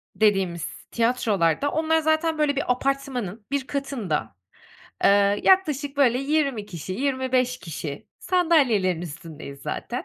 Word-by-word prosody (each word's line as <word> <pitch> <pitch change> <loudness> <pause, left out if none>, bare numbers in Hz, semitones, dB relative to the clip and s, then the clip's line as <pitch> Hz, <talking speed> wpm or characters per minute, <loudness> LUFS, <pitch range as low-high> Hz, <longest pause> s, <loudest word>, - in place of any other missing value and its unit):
dediğimiz 195 -6 0
tiyatrolarda 230 - +1
onlar 320 0 +2
zaten, 315 0 +1
böyle, 295 -2 +1
bir 270 -2 0
apartmanın 250 -6 -2
bir 280 -1 -1
katında, 215 - -3 0.7
eee, 200 0 +4
yaklaşık 295 -7 +3
böyle 250 -3 +4
20 275 -6 0
kişi, 180 -1 -6
25 255 0 0
kişi 150 -3 -7
sandalyelerin 270 - +2
üstündeyiz 150 -3 -9
zaten. - - -4
250 Hz, 115 wpm, -24 LUFS, 190-285 Hz, 0.7 s, eee